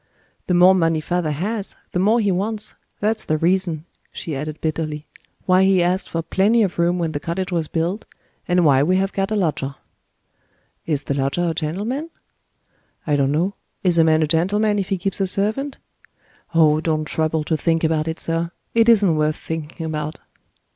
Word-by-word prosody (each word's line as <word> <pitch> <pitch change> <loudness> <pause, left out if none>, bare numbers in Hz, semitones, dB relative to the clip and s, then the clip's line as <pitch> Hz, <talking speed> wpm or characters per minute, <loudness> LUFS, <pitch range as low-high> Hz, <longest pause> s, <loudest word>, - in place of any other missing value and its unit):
"The 180 - +2
more 180 +2 +7
money 165 -3 +2
father 175 +1 -1
has, 195 +8 -3 0.2
the 180 - -1
more 215 +5 +3
he 205 -3 +2
wants. 210 +3 -2 0.3
That's 215 +1 +1
the 155 - 0
reason," 170 -1 0 0.3
she 165 -6 -5
added 150 +2 -5
bitterly, 155 -1 -3 0.4
"why 185 0 +4
he 190 -2 +4
asked 180 +2 0
for 165 0 -2
plenty 205 +7 +3
of 185 -3 -2
room 175 +1 +2
when 165 -2 -1
the 145 - -3
cottage 185 +5 -3
was 165 -3 -1
built, 175 +7 -2 0.4
and 180 -1 +3
why 135 -3 +5
we 180 +6 +2
have 195 +1 0
got 195 0 -1
a 215 - -1
lodger." 150 -8 -1 1.1
"Is 145 -3 -1
the - - -2
lodger 140 +6 0
a - - -1
gentleman?" 205 - -3 1.0
"I 150 - +1
don't 140 -1 +2
know. 175 +7 0 0.3
Is 175 -3 +3
a - - +7
man 160 0 +3
a - - +3
gentleman, 205 +7 +1
if 190 - -3
he 195 - 0
keeps 195 +2 -2
a 195 - +2
servant? 220 +9 -1 0.8
Oh, 155 -1 +4
don't 155 -2 0
trouble 155 0 0
to 160 - 0
think 165 +1 0
about 160 -1 +1
it, 160 0 -3
sir! 165 0 0 0.2
It 230 0 +4
isn't 200 -7 +5
worth 155 0 +1
thinking 160 +1 -6
about." 155 -1 -4
170 Hz, 190 wpm, -21 LUFS, 155-195 Hz, 1.1 s, more